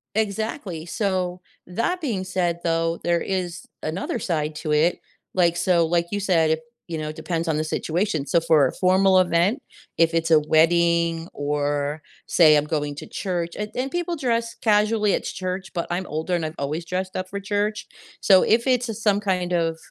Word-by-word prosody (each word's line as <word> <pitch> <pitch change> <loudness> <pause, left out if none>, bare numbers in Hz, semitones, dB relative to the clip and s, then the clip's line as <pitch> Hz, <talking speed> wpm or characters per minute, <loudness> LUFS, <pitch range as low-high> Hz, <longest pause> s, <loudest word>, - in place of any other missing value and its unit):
Exactly. 210 - -2
So 185 -3 -1 0.3
that 230 - -1
being 230 - -2
said 175 -2 -1
though, 165 0 0
there 170 0 +1
is 180 -2 -3 0.2
another 165 +5 -3
side 155 -3 -2
to 150 - -3
it. 155 +4 +2 0.3
Like 175 -2 +3
so 175 -1 +3
like 170 +1 +1
you 205 - -1
said 165 -5 +2
it, 160 0 +1 0.3
you 165 -2 -4
know, 155 0 -3
depends 165 +1 -3
on 155 - +1
the 155 - 0
situation. 160 0 -1
So 170 +5 +3
for 155 -4 +4
a - - -6
formal 190 +1 +4
event, 185 - +2 0.4
if 165 0 +3
it's 165 0 0
a 160 - +7
wedding 165 +1 +2
or 145 +1 -1 0.3
say 155 -3 +6
I'm 150 - +1
going 150 -2 -2
to - - -8
church 175 -3 -3
and 210 0 -4
and 260 +2 -2
people 350 +1 -2
dress 235 -6 -1
casually 210 -1 +2
at - - -1
church, 185 +1 -4
but 170 - -2
I'm 180 +2 -2
older 160 +4 -2
and 165 -2 -2
I've 155 - -6
always 150 +4 -3
dressed 185 +2 -3
up 185 0 -3
for 200 +1 -5
church. 205 +1 -2 0.3
So 190 -2 +6
if 230 +3 +2
it's 240 -4 0
some 205 -2 +3
kind 180 -3 -1
of 165 -2 +1
175 Hz, 185 wpm, -23 LUFS, 160-200 Hz, 0.4 s, a